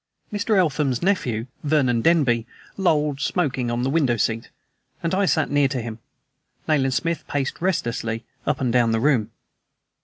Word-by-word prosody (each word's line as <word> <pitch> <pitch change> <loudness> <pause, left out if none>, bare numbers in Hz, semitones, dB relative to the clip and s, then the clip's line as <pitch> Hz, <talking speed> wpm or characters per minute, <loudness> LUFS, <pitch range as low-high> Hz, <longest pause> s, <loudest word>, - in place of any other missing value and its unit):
Mr. 210 +1 +1
Eltham's 150 -7 +1
nephew, 125 - 0 0.2
Vernon 140 -6 +2
Denby, 125 -7 +3 0.3
lolled 150 -6 +1
smoking 135 -7 0
on 120 +1 -1
the 130 - +1
window 135 -7 +2
seat, 115 +1 -1 0.5
and 165 - -1
I 195 +1 +2
sat 155 -5 +1
near 145 -1 +4
to 130 -1 -3
him. 115 -1 -6 0.7
Nayland 135 -4 +2
Smith 170 +1 -1
paced 140 +1 -2
restlessly 120 -10 -1 0.2
up - - +1
and 125 -3 0
down 120 -2 +3
the 115 - +1
room. 120 -5 +2
135 Hz, 155 wpm, -23 LUFS, 120-160 Hz, 0.7 s, near